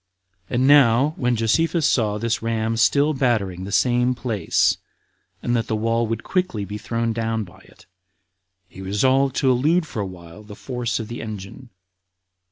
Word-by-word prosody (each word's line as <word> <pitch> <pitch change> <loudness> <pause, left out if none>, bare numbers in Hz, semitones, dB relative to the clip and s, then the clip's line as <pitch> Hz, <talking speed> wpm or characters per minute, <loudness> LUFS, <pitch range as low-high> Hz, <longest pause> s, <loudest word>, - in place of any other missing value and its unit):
20. - - -5
And 130 +2 +3
now, 140 0 +5
when 125 -1 0
Josephus 160 +9 +1
saw 105 -7 +1
this 115 +1 -1
ram 115 0 -1
still 140 +7 +3
battering 105 -9 -1
the 100 - -7
same 125 +2 +2
place, 110 -8 +1 0.7
and 120 - 0
that 115 -1 -1
the 110 - -1
wall 115 +1 0
would 115 0 -3
quickly 180 - -1
be 105 +1 -6
thrown 115 0 -2
down 115 -1 -2
by 95 -1 -15
it, - - -20 0.8
he 95 - -12
resolved 130 +8 +1
to 130 - +2
elude 155 +8 +2
for 115 -8 -5
a 100 - -3
while 85 +1 -12
the 105 -1 -12
force 120 -1 -3
of 110 - -5
the 120 - -6
engine. 110 +3 -8
115 Hz, 175 wpm, -22 LUFS, 105-130 Hz, 0.8 s, now